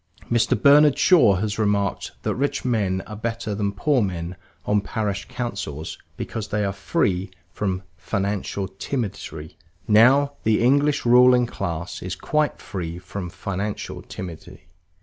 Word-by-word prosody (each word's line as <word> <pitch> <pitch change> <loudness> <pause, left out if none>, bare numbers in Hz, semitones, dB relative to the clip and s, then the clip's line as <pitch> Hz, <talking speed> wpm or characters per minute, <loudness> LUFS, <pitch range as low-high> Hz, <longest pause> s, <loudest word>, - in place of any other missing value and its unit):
Mr. 115 -1 +2
Bernard 145 0 +6
Shaw 125 - +6
has 105 +3 -2
remarked 100 -2 0
that - - 0
rich 140 +1 -1
men 100 -6 0
are 105 - -8
better 115 0 -3
than 100 0 -1
poor 130 +6 +1
men 90 -3 -3 0.3
on 105 0 +2
parish 105 -1 -3
councils 100 - -4 0.2
because 110 -2 -4
they 105 0 -1
are 100 - -1
free 95 -1 0 0.2
from 95 -2 -2
"financial 100 +1 -2
timidity." 95 - -5 0.3
Now, 130 +7 +5
the 110 -1 +2
English 140 +3 +3
ruling 125 +1 +6
class 85 -7 -4
is 90 -1 -4
quite 150 +8 0
free 85 -4 -5
from 90 0 -6
financial 100 +3 -4
timidity. 85 -4 -9
105 Hz, 135 wpm, -23 LUFS, 95-120 Hz, 0.3 s, Bernard